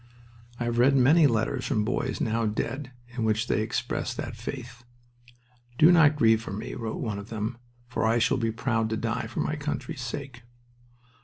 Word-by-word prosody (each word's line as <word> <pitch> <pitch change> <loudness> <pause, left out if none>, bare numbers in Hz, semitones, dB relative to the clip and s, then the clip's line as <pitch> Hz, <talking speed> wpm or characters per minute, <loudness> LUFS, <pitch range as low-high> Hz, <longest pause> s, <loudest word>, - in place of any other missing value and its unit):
I - - -1
have 120 0 -1
read 135 +3 +5
many 145 +5 +6
letters 115 -4 0
from 110 -6 +1
boys - - -1
now 115 0 0
dead 130 +5 -3 0.2
in 120 - -2
which 110 +1 +1
they 110 - +1
express 110 - -2
that - - -5
faith. 120 -2 -7 0.9
"Do 160 +5 +7
not 155 -4 +6
grieve 110 -6 +4
for 115 - -7
me," 100 - -5
wrote 115 -2 -4
one 105 -3 -2
of 100 +3 -10
them, 115 +2 -4 0.3
"for 120 - -2
I 115 +1 +3
shall 115 +2 +2
be 115 -2 0
proud 115 -1 0
to 110 - -1
die 115 +1 -2
for 120 - -3
my 155 - -1
country's 150 -3 -4
sake." 130 0 -6
120 Hz, 185 wpm, -27 LUFS, 110-130 Hz, 0.9 s, Do